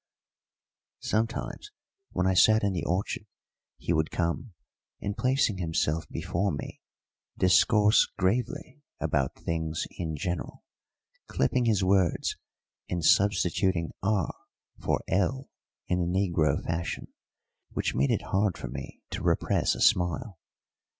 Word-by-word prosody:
Sometimes, 115 Hz, -, -2 dB, 0.4 s
when -, -, -1 dB
I 95 Hz, -, +3 dB
sat 110 Hz, +4 st, +5 dB
in 100 Hz, -1 st, +1 dB
the 90 Hz, -, -2 dB
orchard, 95 Hz, +3 st, -2 dB, 0.5 s
he 85 Hz, -, -1 dB
would 80 Hz, -1 st, +1 dB
come, 85 Hz, +6 st, -2 dB, 0.5 s
and, 100 Hz, 0 st, -3 dB
placing 125 Hz, -4 st, +1 dB
himself 80 Hz, -2 st, -1 dB
before 90 Hz, +3 st, -1 dB
me, 70 Hz, -, -6 dB, 0.6 s
discourse 105 Hz, +3 st, +5 dB
gravely 120 Hz, +9 st, -1 dB, 0.2 s
about 65 Hz, -2 st, 0 dB
things 80 Hz, -1 st, -2 dB
in 80 Hz, -3 st, -2 dB
general, 85 Hz, +4 st, -4 dB, 0.6 s
clipping 120 Hz, -, +1 dB
his 105 Hz, -4 st, +2 dB
words 95 Hz, -2 st, +2 dB, 0.5 s
and 85 Hz, -2 st, -1 dB
substituting 95 Hz, -3 st, +3 dB
r 100 Hz, 0 st, +1 dB, 0.5 s
for -, -, 0 dB
l 120 Hz, +8 st, 0 dB, 0.4 s
in 90 Hz, -, +1 dB
the 85 Hz, -, 0 dB
negro 90 Hz, -4 st, +1 dB
fashion, 85 Hz, +1 st, -3 dB, 0.6 s
which -, -, -2 dB
made 70 Hz, +2 st, +2 dB
it -, -, +1 dB
hard 100 Hz, -1 st, 0 dB
for 65 Hz, -, -6 dB
me 65 Hz, +1 st, -8 dB
to -, -, -4 dB
repress -, -, +1 dB
a -, -, -6 dB
smile. 90 Hz, +2 st, +2 dB
95 Hz, 125 wpm, -28 LUFS, 85-105 Hz, 0.6 s, sat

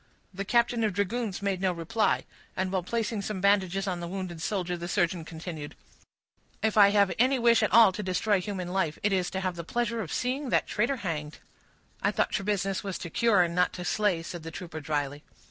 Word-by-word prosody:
The 195 Hz, +2 st, -4 dB
captain 235 Hz, +1 st, +2 dB
of 210 Hz, -3 st, +1 dB
dragoons 205 Hz, +1 st, -2 dB
made 195 Hz, -2 st, -1 dB
no 190 Hz, -1 st, +2 dB
reply; 185 Hz, +6 st, 0 dB, 0.3 s
and, 185 Hz, 0 st, -1 dB
while 190 Hz, -1 st, 0 dB
placing 225 Hz, +3 st, -2 dB
some 200 Hz, -1 st, -4 dB
bandages 195 Hz, -1 st, +2 dB
on 180 Hz, -2 st, -2 dB
the 170 Hz, -, -5 dB
wounded 180 Hz, -2 st, -5 dB
shoulder, 180 Hz, -2 st, -1 dB
the 175 Hz, 0 st, -6 dB
surgeon 175 Hz, -1 st, 0 dB
continued,— 160 Hz, -2 st, -7 dB, 0.9 s
"If 220 Hz, -1 st, +1 dB
I 205 Hz, -2 st, +8 dB
have 200 Hz, -2 st, +3 dB
any 260 Hz, +3 st, +4 dB
wish 235 Hz, -1 st, +4 dB
at 215 Hz, -, +1 dB
all 225 Hz, -1 st, +8 dB
to 185 Hz, -, -5 dB
destroy 190 Hz, +1 st, +1 dB
human 185 Hz, -2 st, -4 dB
life, 180 Hz, -5 st, -1 dB
it 205 Hz, -1 st, +2 dB
is 180 Hz, -2 st, +1 dB
to 190 Hz, -, -3 dB
have 185 Hz, -2 st, -2 dB
the 170 Hz, -, -5 dB
pleasure 230 Hz, +4 st, -1 dB
of 165 Hz, -, -6 dB
seeing 260 Hz, +2 st, -1 dB
that -, -, +2 dB
traitor 235 Hz, +6 st, 0 dB
hanged." 150 Hz, -3 st, -3 dB, 0.6 s
"I -, -, +2 dB
thought -, -, 0 dB
your 195 Hz, -, -7 dB
business 195 Hz, -2 st, -1 dB
was 195 Hz, -2 st, -3 dB
to 170 Hz, -, -7 dB
cure, 220 Hz, -4 st, +4 dB
and 170 Hz, -1 st, -2 dB
not 180 Hz, +1 st, +2 dB
to 180 Hz, -, -6 dB
slay," 200 Hz, -6 st, +1 dB
said 170 Hz, 0 st, -7 dB
the 165 Hz, -, -7 dB
trooper, 165 Hz, -1 st, -7 dB
dryly. 145 Hz, -1 st, -3 dB
190 Hz, 215 wpm, -28 LUFS, 175-210 Hz, 0.9 s, I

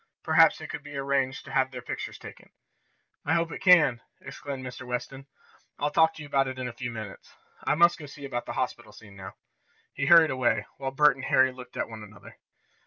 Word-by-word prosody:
Perhaps 160 Hz, 0 st, +5 dB
it -, -, -9 dB
could -, -, -6 dB
be 145 Hz, -1 st, -9 dB
arranged 135 Hz, -1 st, -1 dB
to -, -, -10 dB
have 130 Hz, -1 st, +2 dB
their 125 Hz, -2 st, -9 dB
pictures -, -, -6 dB
taken." -, -, -13 dB, 0.7 s
"I 160 Hz, -, +1 dB
hope 170 Hz, 0 st, 0 dB
it -, -, -7 dB
can!" 170 Hz, -10 st, +5 dB, 0.2 s
exclaimed 135 Hz, -2 st, -7 dB
Mr. 125 Hz, 0 st, -8 dB
Weston. 130 Hz, +2 st, -5 dB, 0.5 s
"I'll 145 Hz, 0 st, -1 dB
talk 160 Hz, +1 st, +3 dB
to 155 Hz, -, -9 dB
you -, -, -10 dB
about 135 Hz, -1 st, +1 dB
it 130 Hz, 0 st, -6 dB
in 130 Hz, -1 st, -4 dB
a 120 Hz, -, -7 dB
few 120 Hz, +1 st, -5 dB
minutes. 110 Hz, -4 st, -9 dB, 0.3 s
I -, -, +1 dB
must 170 Hz, +2 st, +4 dB
go 150 Hz, -, -9 dB
see 140 Hz, 0 st, -10 dB
about 120 Hz, -3 st, -4 dB
this 120 Hz, -, -5 dB
hospital 120 Hz, -4 st, -4 dB
scene 105 Hz, -3 st, -15 dB
now." 95 Hz, -1 st, -10 dB, 0.6 s
He 135 Hz, 0 st, -2 dB
hurried 165 Hz, -1 st, +7 dB
away, 120 Hz, -5 st, 0 dB
while 135 Hz, -1 st, -3 dB
Bert 140 Hz, 0 st, +4 dB
and 130 Hz, -, -7 dB
Harry 130 Hz, 0 st, +4 dB
looked 125 Hz, 0 st, -12 dB
at -, -, -1 dB
one 110 Hz, -1 st, -10 dB
another. 105 Hz, -2 st, -14 dB
130 Hz, 220 wpm, -27 LUFS, 120-145 Hz, 0.7 s, hurried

